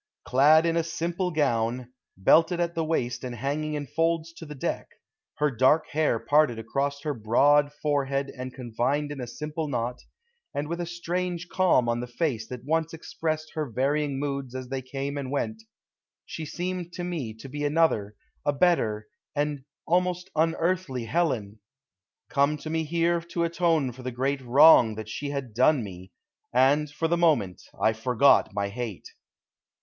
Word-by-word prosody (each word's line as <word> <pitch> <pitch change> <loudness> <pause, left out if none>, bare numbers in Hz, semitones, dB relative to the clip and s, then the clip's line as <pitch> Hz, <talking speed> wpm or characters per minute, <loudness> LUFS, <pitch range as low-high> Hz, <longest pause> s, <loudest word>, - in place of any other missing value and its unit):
Clad 150 +5 +5
in 165 0 +1
a 165 - +3
simple 170 +2 -2
gown, 125 -5 0 0.2
belted 165 - +4
at 170 -1 0
the 165 - -1
waist 125 -6 -1
and 125 -1 -5
hanging 145 +5 -2
in 145 -1 -3
folds 165 +3 -1
to 165 -1 -10
the 150 - -8
deck, 135 - -3 0.5
her 150 0 +1
dark 130 +6 +3
hair 155 -5 +2
parted 145 -1 +2
across 140 +5 -2
her 150 -2 -1
broad 140 +6 +3
forehead 140 -2 -1
and 130 0 -6
confined 130 +4 -2
in 140 -3 -6
a 125 - -5
simple 150 +5 -4
knot, 125 -2 -2 0.6
and 145 +1 -2
with 170 +2 -3
a 170 - -4
strange 175 0 -3
calm 180 -10 +3
on 120 0 0
the 125 - -4
face 120 -3 -2
that 125 0 -8
once 160 +2 0
expressed 155 -1 -4
her 155 -3 -3
varying 140 +4 0
moods 140 -2 -3
as 130 -1 -6
they 135 0 -3
came 135 +2 -4
and 135 -2 -5
went, 215 +11 -2 0.6
she 160 -2 -6
seemed 180 +1 -4
to 180 - -5
me 165 -10 -3
to 110 +5 -10
be 145 +2 -5
another, 145 -9 +1 0.3
a 145 - +2
better, 115 -10 +1 0.3
an 145 -2 -1 0.2
almost 180 +2 0
unearthly 165 -4 0
Helen, 115 -8 -1 0.7
come 140 +2 +2
to 155 +2 -7
me 160 0 0
here 170 +2 +1
to 170 0 -3
atone 165 -5 +1
for 125 +2 -12
the 130 - -4
great 135 +3 -1
wrong 125 -3 +6
that 110 0 -7
she 145 +5 -4
had 140 -5 -4
done 130 +3 +3
me; 95 -2 -10 0.4
and, 140 +4 +3
for 150 +3 -2
the 170 +1 +1
moment, 150 - +2 0.2
I 110 - +3
forgot 125 +1 +3
my 100 0 -2
hate. 115 -3 -6
145 Hz, 170 wpm, -26 LUFS, 125-165 Hz, 0.7 s, wrong